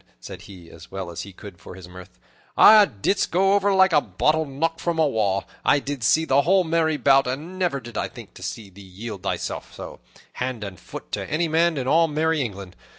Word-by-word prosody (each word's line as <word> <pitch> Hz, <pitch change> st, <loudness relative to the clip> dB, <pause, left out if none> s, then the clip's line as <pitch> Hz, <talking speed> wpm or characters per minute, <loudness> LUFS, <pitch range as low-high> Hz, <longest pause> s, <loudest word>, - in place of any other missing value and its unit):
said -, -, -10 dB
he, 90 Hz, -4 st, -13 dB
as 80 Hz, +1 st, -14 dB
well 95 Hz, -2 st, -6 dB
as 85 Hz, -, -6 dB
he 100 Hz, -, -9 dB
could 95 Hz, -1 st, -13 dB
for 90 Hz, -, -11 dB
his 95 Hz, -1 st, -12 dB
mirth, 90 Hz, 0 st, -13 dB, 0.4 s
"'a 215 Hz, -1 st, +8 dB
didst 135 Hz, -, -1 dB
go 195 Hz, +3 st, +2 dB
over 200 Hz, 0 st, +2 dB
like 190 Hz, -2 st, +4 dB
a 150 Hz, -, +5 dB
bottle 155 Hz, +11 st, 0 dB
knocked 165 Hz, +4 st, -3 dB
from 170 Hz, -1 st, -2 dB
a 160 Hz, -, +3 dB
wall. 100 Hz, -6 st, 0 dB, 0.2 s
I -, -, +4 dB
did 140 Hz, -3 st, -5 dB
see 160 Hz, +10 st, +3 dB
the 140 Hz, -2 st, +3 dB
whole 185 Hz, +4 st, +3 dB
merry 160 Hz, -2 st, 0 dB
bout, 135 Hz, -2 st, +4 dB
and 155 Hz, +9 st, -5 dB
never 175 Hz, -7 st, 0 dB
did 120 Hz, -2 st, -7 dB
I -, -, -2 dB
think -, -, -13 dB
to -, -, -14 dB
see 105 Hz, -4 st, -7 dB
thee 100 Hz, +2 st, -14 dB
yield 100 Hz, +2 st, -9 dB
thyself 95 Hz, -, -4 dB
so, -, -, -9 dB, 0.3 s
hand 125 Hz, -3 st, -4 dB
and 95 Hz, -3 st, -8 dB
foot, -, -, -10 dB
to -, -, -4 dB
any 165 Hz, +2 st, 0 dB
man 165 Hz, 0 st, +1 dB
in 130 Hz, -1 st, -3 dB
all 165 Hz, +4 st, +4 dB
merry 160 Hz, 0 st, 0 dB
England. 100 Hz, -6 st, -6 dB
140 Hz, 225 wpm, -23 LUFS, 100-165 Hz, 0.4 s, a